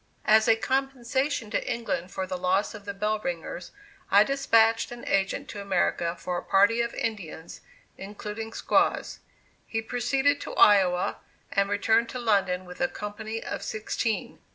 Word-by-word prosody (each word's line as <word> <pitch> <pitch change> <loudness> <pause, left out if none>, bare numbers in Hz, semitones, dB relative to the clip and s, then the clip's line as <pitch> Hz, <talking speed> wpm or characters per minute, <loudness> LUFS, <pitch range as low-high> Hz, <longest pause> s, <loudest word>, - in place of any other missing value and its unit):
As 220 0 +5
a 225 - +6
compensation 265 -1 -1
to - - -1
England 185 -6 -3
for 190 - -3
the 185 - -4
loss 185 +4 0
of 210 -2 -10
the 200 - -4
Bell 210 +2 0
Ringers, 175 -2 -5 0.4
I 200 +2 +7
despatched 230 -4 +3
an 240 0 -9
agent 195 +8 0
to 205 - -6
America 175 -3 0
for 180 0 -3
a - - -11
party 205 +4 +4
of 235 0 -3
Indians, 175 -7 -5 0.4
including 210 +3 -6
squaws. - - +1 0.5
He 225 - -2
proceeded 265 +5 0
to - - -6
Iowa, 185 -3 +4 0.3
and 200 0 +1
returned 220 +3 +2
to 250 - -5
London 195 -5 +1
with 180 +5 -10
a 265 - +3
company 220 0 -6
of - - -5
sixteen. 220 +1 -3
215 Hz, 155 wpm, -27 LUFS, 195-230 Hz, 0.5 s, I